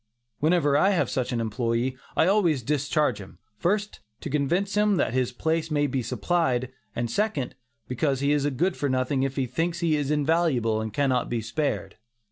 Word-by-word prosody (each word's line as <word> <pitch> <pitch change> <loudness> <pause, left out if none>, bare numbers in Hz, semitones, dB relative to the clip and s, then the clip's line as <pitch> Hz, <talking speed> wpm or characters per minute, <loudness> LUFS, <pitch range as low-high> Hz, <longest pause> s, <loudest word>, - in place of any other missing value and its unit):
Whenever 155 -2 +3
I 190 - +4
have 195 -4 +1
such 130 -2 -1
an 120 - -1
employee, 115 +3 -1 0.2
I - - +5
always 175 - +2
discharge 145 -3 0
him; 95 - -12 0.2
first, 205 +3 0 0.2
to 150 - -5
convince 170 +8 0
him 210 -1 +3
that - - +1
his 125 -1 +1
place 160 +5 -1
may 145 -1 +1
be 135 -2 -1
supplied, 130 0 0 0.2
and 120 0 -1
second, 175 - -1 0.3
because 135 +2 0
he 140 +1 +1
is 145 -1 +2
good 175 +8 0
for 145 - -1
nothing 130 +1 0
if 135 0 -1
he 135 - 0
thinks 165 +7 -2
he 165 -2 +2
is 145 -2 -1
invaluable 145 -7 +1
and 110 0 -4
cannot 130 0 +1
be 120 - -1
spared. 140 +7 -2
140 Hz, 185 wpm, -26 LUFS, 125-165 Hz, 0.3 s, I